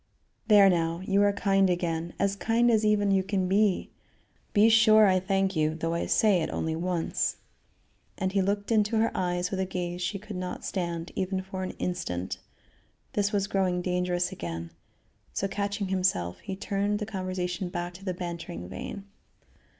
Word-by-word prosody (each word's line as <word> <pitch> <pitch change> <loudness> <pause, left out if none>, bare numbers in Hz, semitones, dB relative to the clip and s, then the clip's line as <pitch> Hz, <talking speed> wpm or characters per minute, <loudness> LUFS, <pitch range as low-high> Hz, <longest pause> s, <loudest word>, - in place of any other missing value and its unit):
"There 205 -2 +7
now! 170 -2 +1
you 200 +1 +3
are 205 0 +4
kind 195 -1 +2
again; 170 -1 -2
as 200 0 +1
kind 235 +3 +2
as 220 -1 +3
even 210 -1 +3
you 195 -1 +4
can 190 -1 -1
be. 200 0 +2 0.6
Be 210 +1 +5
sure, 220 -1 +7
I 185 -2 +4
thank 195 0 0
you, 155 0 +1
though 165 +1 -2
I 170 - -1
say 205 -5 +3
it 160 - -2
only 160 0 -2
once," 170 0 -1 0.8
and 190 -1 -1
he 195 0 +2
looked 200 +3 -1
into 215 0 +2
her 225 +1 +2
eyes 180 0 -1
with 190 - -2
a 190 - +1
gaze 180 -1 -4
she 180 +3 -1
could 210 +1 -9
not 180 0 -5
stand 170 -2 -3
even 190 0 -1
for 190 0 -6
an 185 - -4
instant. 130 - -3 0.7
This 205 0 +1
was 200 -2 +1
growing 185 -3 0
dangerous 180 -1 0
again, 85 0 -6 0.6
so, 195 - -1
catching 200 0 -2
himself, 180 - 0
he 195 -2 -6
turned 200 +1 -1
the 210 - -3
conversation 185 -3 -3
back 175 0 -4
into 190 +3 -12
the 185 -2 -2
bantering 170 - -6
vein. 195 - -7
190 Hz, 175 wpm, -28 LUFS, 175-200 Hz, 0.8 s, There